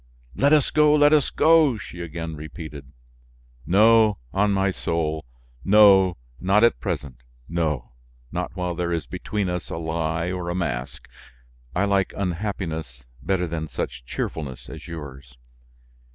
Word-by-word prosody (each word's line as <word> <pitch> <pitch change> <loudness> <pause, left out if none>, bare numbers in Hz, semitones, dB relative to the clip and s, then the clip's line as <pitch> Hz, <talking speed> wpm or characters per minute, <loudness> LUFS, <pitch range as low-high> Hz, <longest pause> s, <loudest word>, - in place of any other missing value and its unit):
"Let 140 +1 +3
us 150 -3 +4
go, 150 -1 +5
let 145 0 +5
us 150 -3 +4
go!" 155 -5 +4
she 90 -3 -9
again 80 -1 -5
repeated. 75 -3 -9 0.8
"No, 110 +3 +5 0.2
on 100 +2 +2
my 95 0 +2
soul! 80 -3 -2 0.4
No, 95 -3 +6 0.2
not 100 +4 +3
at 115 - +4
present; 70 - -4 0.3
no, 75 -8 -2 0.4
not - - -4
while 90 -1 -2
there 85 0 -2
is 85 -3 -1
between 105 -3 -3
us 90 0 -4
a - - -4
lie 80 +1 -2
or 90 -2 -4
a 85 - -2
mask. 85 -9 -4 0.7
I 95 +3 +2
like 100 -2 +1
unhappiness 85 - -4 0.2
better 95 +1 0
than 80 -1 -4
such - - -5
cheerfulness 65 0 -5
as - - -10
yours." 70 -6 -9
85 Hz, 140 wpm, -24 LUFS, 80-100 Hz, 0.8 s, No